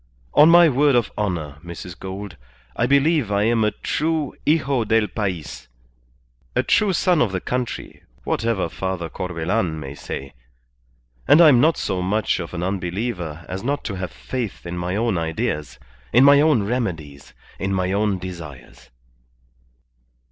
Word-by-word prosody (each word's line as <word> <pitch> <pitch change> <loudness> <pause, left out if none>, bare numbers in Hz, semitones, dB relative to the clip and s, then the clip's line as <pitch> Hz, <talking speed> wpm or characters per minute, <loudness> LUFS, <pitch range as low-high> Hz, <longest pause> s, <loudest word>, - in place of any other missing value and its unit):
On 150 +2 +7
my 170 0 +8
word 145 -1 +3
of 120 -5 +1
honour, 85 -9 -3
Mrs. 85 0 -9
Gould, 95 -1 -7 0.4
I 120 - +1
believe 140 -3 +2
I 100 0 +2
am 115 0 +2
a 105 - +3
true 155 +6 -2
hijo 140 -5 +2
del 110 0 +2
pays, 85 - -4 0.9
a - - +2
true 210 -2 +3
son 180 -2 +2
of 110 - +2
the 95 - -2
country, 125 +4 -4 0.2
whatever 115 - 0
Father 90 -1 -4
Corbelan 90 0 -2
may 70 -2 -7
say. 70 -1 -7 0.9
And 155 - +7
I'm 150 -8 +7
not 160 +2 +3
so 95 -3 -2
much 105 +3 0
of 85 +1 -6
an 85 - -3
unbeliever 90 -3 -3
as 95 +2 -5
not 140 +3 -1
to 105 - -4
have 90 -1 -4
faith 120 -9 -5
in 85 +1 -5
my 90 +1 -3
own 110 -4 0
ideas, 75 -4 -3 0.3
in 125 +4 +6
my 140 +1 +7
own 150 -8 +3
remedies, 90 - -4 0.2
in 95 0 -2
my 95 -1 0
own 100 0 +1
desires." 75 -9 -10
100 Hz, 155 wpm, -22 LUFS, 85-125 Hz, 0.9 s, my